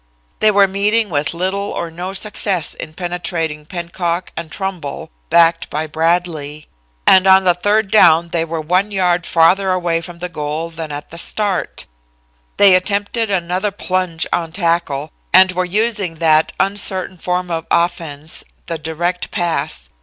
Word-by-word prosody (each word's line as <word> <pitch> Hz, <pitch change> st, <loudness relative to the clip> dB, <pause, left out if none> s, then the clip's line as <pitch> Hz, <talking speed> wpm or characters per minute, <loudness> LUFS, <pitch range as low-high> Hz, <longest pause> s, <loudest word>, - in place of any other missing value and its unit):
They 215 Hz, -, +5 dB
were 200 Hz, -1 st, +5 dB
meeting 205 Hz, +2 st, +1 dB
with 145 Hz, 0 st, +1 dB
little 190 Hz, +4 st, -2 dB
or 170 Hz, -, -4 dB
no 180 Hz, +3 st, -6 dB
success 195 Hz, -4 st, -1 dB
in 155 Hz, -, -9 dB
penetrating 165 Hz, -4 st, -3 dB
Pennock 175 Hz, 0 st, -3 dB
and 165 Hz, -2 st, -6 dB
Trumbull, 185 Hz, -, -5 dB, 0.2 s
backed 165 Hz, 0 st, +3 dB
by 155 Hz, +2 st, -2 dB
Bradlee. 160 Hz, -2 st, -1 dB, 0.4 s
And 190 Hz, 0 st, +6 dB
on 190 Hz, 0 st, +6 dB
the 180 Hz, -1 st, +4 dB
third 205 Hz, +3 st, 0 dB
down 170 Hz, -5 st, +5 dB
they 165 Hz, -1 st, 0 dB
were 165 Hz, 0 st, -4 dB
one 180 Hz, +6 st, +1 dB
yard 180 Hz, -3 st, 0 dB
farther 185 Hz, +4 st, +3 dB
away 175 Hz, -2 st, 0 dB
from 170 Hz, 0 st, -10 dB
the 180 Hz, +1 st, -4 dB
goal 155 Hz, 0 st, -4 dB
than 160 Hz, -2 st, -6 dB
at 145 Hz, 0 st, -7 dB
the 170 Hz, -, -1 dB
start. 200 Hz, 0 st, -1 dB, 0.7 s
They 200 Hz, -2 st, +7 dB
attempted 205 Hz, +4 st, 0 dB
another 185 Hz, +1 st, -1 dB
plunge 185 Hz, -4 st, -1 dB
on 165 Hz, -2 st, -1 dB
tackle, 165 Hz, -5 st, -1 dB, 0.2 s
and 185 Hz, 0 st, +7 dB
were 185 Hz, 0 st, -1 dB
using 205 Hz, -2 st, -1 dB
that 160 Hz, -1 st, +3 dB
uncertain 190 Hz, -2 st, 0 dB
form 180 Hz, +1 st, -2 dB
of 165 Hz, -1 st, -3 dB
offense, 165 Hz, -3 st, -1 dB, 0.2 s
the 165 Hz, -1 st, -4 dB
direct 175 Hz, +3 st, -3 dB
pass. 175 Hz, -4 st, -2 dB
175 Hz, 155 wpm, -17 LUFS, 165-190 Hz, 0.7 s, They